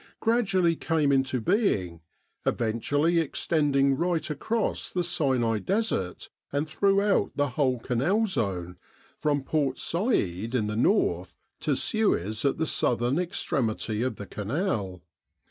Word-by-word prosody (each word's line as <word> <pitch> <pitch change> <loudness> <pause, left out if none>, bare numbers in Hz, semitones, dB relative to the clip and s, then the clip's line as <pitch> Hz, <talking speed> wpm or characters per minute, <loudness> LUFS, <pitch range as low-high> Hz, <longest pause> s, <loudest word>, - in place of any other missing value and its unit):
gradually 195 -7 +2
came 155 -3 +1
into 135 -1 +1
being, 100 - 0 0.4
eventually 145 +9 +1
extending 145 -3 +1
right 165 -1 -1
across 220 +10 -1
the 180 - -1
Sinai 130 -10 +1
Desert 190 - -2 0.2
and 145 +2 -1
throughout 200 +4 +2
the 145 -1 +1
whole 130 -1 +1
Canal 140 - +1
zone 90 - -2 0.4
from 145 -2 0
Port 140 -3 0
Said 115 - -1
in 110 -4 +1
the 105 0 -3
north 190 - +1 0.2
to - - 0
Suez 110 - 0
at 140 - +2
the 160 - 0
southern 125 0 +1
extremity 115 - -1
of 130 +1 -1
the 100 - -8
Canal. 105 - -3
140 Hz, 125 wpm, -27 LUFS, 115-175 Hz, 0.4 s, gradually